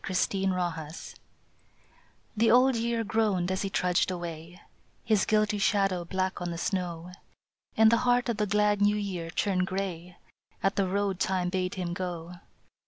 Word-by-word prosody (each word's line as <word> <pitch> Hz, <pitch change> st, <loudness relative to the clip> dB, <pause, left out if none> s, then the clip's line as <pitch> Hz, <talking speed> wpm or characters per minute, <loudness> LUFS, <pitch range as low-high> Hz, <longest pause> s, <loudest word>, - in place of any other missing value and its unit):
BLOOD 190 Hz, +1 st, 0 dB
ROAD 170 Hz, -4 st, -3 dB, 1.4 s
THE 225 Hz, +1 st, +3 dB
Old 250 Hz, +2 st, +5 dB
Year 230 Hz, 0 st, 0 dB
groaned 205 Hz, -5 st, 0 dB
as 190 Hz, +1 st, -1 dB
he 195 Hz, -, -2 dB
trudged 180 Hz, -1 st, +1 dB
away, 175 Hz, -1 st, -6 dB, 0.4 s
His 215 Hz, -3 st, +2 dB
guilty 215 Hz, -1 st, +2 dB
shadow 195 Hz, -3 st, +1 dB
black 185 Hz, +1 st, -2 dB
on 175 Hz, -, -2 dB
the 170 Hz, -, -4 dB
snow, 175 Hz, -1 st, -3 dB, 0.7 s
And 220 Hz, 0 st, +6 dB
the 230 Hz, -, +5 dB
heart 245 Hz, +1 st, +2 dB
of 235 Hz, -3 st, -1 dB
the 210 Hz, 0 st, 0 dB
glad 210 Hz, 0 st, +2 dB
New 205 Hz, +1 st, +4 dB
Year 185 Hz, -5 st, -4 dB
turned 185 Hz, +1 st, 0 dB
grey 180 Hz, -2 st, -4 dB, 0.5 s
At 195 Hz, -, +2 dB
the 195 Hz, -2 st, +1 dB
road 195 Hz, 0 st, -1 dB
Time 185 Hz, -2 st, 0 dB
bade 185 Hz, 0 st, -2 dB
him 180 Hz, -2 st, -3 dB
go. 175 Hz, -2 st, -5 dB
190 Hz, 160 wpm, -28 LUFS, 180-210 Hz, 1.4 s, And